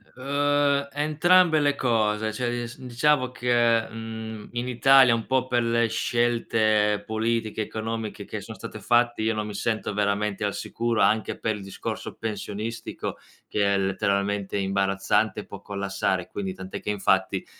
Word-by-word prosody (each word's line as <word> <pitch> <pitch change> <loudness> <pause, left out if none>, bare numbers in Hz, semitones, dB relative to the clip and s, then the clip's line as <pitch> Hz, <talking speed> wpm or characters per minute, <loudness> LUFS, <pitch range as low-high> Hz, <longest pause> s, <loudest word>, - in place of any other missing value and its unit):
Uhm, 140 +1 +1
entrambe 155 +3 +4
le 145 -1 +2
cose, 110 -3 +1
cioè 120 +1 -1
dis 120 0 -4
diciamo 130 +1 +1
che, 120 -2 +2
mhmm, 110 -1 -7
in 120 +1 -2
Italia 130 0 +6
un 115 - -4
po' 130 -1 +1
per 120 -2 +1
le 115 0 +2
scelte 110 -3 +1
politiche 110 0 -1
economiche 110 0 -4
che - - -6
sono - - -9
state - - -8
fatte 120 -1 +2
io 110 +1 +1
non 105 0 -2
mi 105 - -6
sento 110 0 -2
veramente 105 0 0
al 100 - 0
sicuro 115 -1 -1
anche 110 0 +2
per 110 -1 -1
il 100 - -8
discorso 95 - -6
pensionistico 110 +1 -5 0.3
che 100 -1 +1
è - - +2
letteralmente 100 +1 0
imbarazzante 100 +2 +1
e - - -13
può 100 -1 -10
collassare. 95 -2 -2
Quindi 95 -1 -4
tant'è 95 0 -7
che - - -5
infatti 95 -2 +1
110 Hz, 155 wpm, -25 LUFS, 105-120 Hz, 0.3 s, Italia